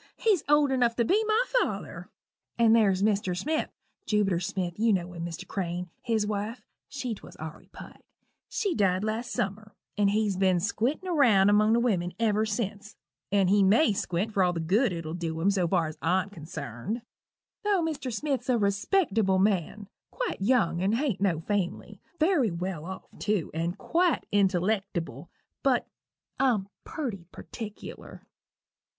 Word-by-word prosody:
he's 415 -8 +2
old 295 -2 +4
enough 245 -3 +2
to 235 - +1
be 415 - +3
my 440 +3 +3 0.2
father. - - -4 0.5
And 230 -1 +5
there's 200 -4 +3
Mr. 200 -4 +1
Smith 310 +11 -1 0.4
Jubiter 200 -5 +2
Smith; 180 -1 -3
you 225 0 +3
know 180 -2 -1
him, 170 -1 -6
Mr. 170 -1 -6
Crane 180 -3 -3
his 225 -3 0
wife 210 +3 -4 0.2
(she 255 -4 -3
'twas 210 - -12
Aurory 160 0 -9
Pike) - - -12 0.5
she 400 -6 -1
died 190 - +1
last 220 +3 -2
summer, 205 +2 -3 0.2
and 205 -1 +3
he's 205 -2 +1
ben 190 -1 +3
squintin' 265 - -1
round 205 -9 +5
among 215 +1 +4
the 235 - +4
wimmin 185 -8 0
ever 220 -1 +2
since, 205 -1 -4 0.4
and 200 -2 +3
he 205 0 +5
may 210 +6 +4
squint 190 +3 -2
for 195 - +2
all 180 -1 +2
the 170 - -3
good 195 +9 +2
it'll 165 -2 -5
dew 165 -2 -3
him 190 +5 +3
so 185 -3 +1
far 170 -1 +2
as 155 0 -7
I'm 185 +4 +1
consarned 160 - -6 0.6
tho' 405 -4 +2
Mr. 295 -5 -3
Smith's 275 +2 -2
a 250 - +4
respectable 200 - +2
man 200 +1 0 0.2
quite - - -4
young 200 -6 +2
and 200 +4 +2
hain't 255 -7 -1
no 175 -6 +1
family 195 0 -3 0.2
very 310 - +3
well 170 -2 -4
off, 190 +1 -7
tew, 205 -6 -1
and 170 +4 -2
quite 345 +6 +1
intellectible 195 -2 0 0.3
but - - +2 0.5
I'm 215 -7 +2 0.2
purty 220 - -5
partickler. 210 -3 -9
205 Hz, 160 wpm, -28 LUFS, 180-235 Hz, 0.6 s, And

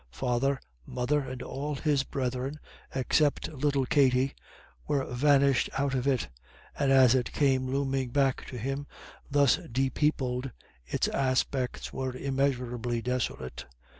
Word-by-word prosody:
Father, 130 - 0 0.2
mother, 125 - 0
and 130 -2 -5
all 145 +2 -4
his 145 0 +1
brethren, 130 +2 -3 0.4
except 140 +3 +1
little 140 -1 +1
Katty, 135 -1 +3 0.5
were 140 -2 +1
vanished 140 +1 +3
out 140 0 0
of 130 0 0
it, 130 - +1 0.5
and 140 -2 +1
as 130 -3 +7
it 130 -2 0
came 130 -3 +2
looming 135 -1 -1
back 135 0 +1
to 125 - -7
him 135 +4 -3 0.4
thus 140 -2 +4
depeopled, 130 0 0 0.4
its - - 0
aspect 130 -1 -1
was 130 -1 -3
immeasurably 125 -3 -1
desolate. 65 - -3
135 Hz, 125 wpm, -29 LUFS, 125-140 Hz, 0.5 s, as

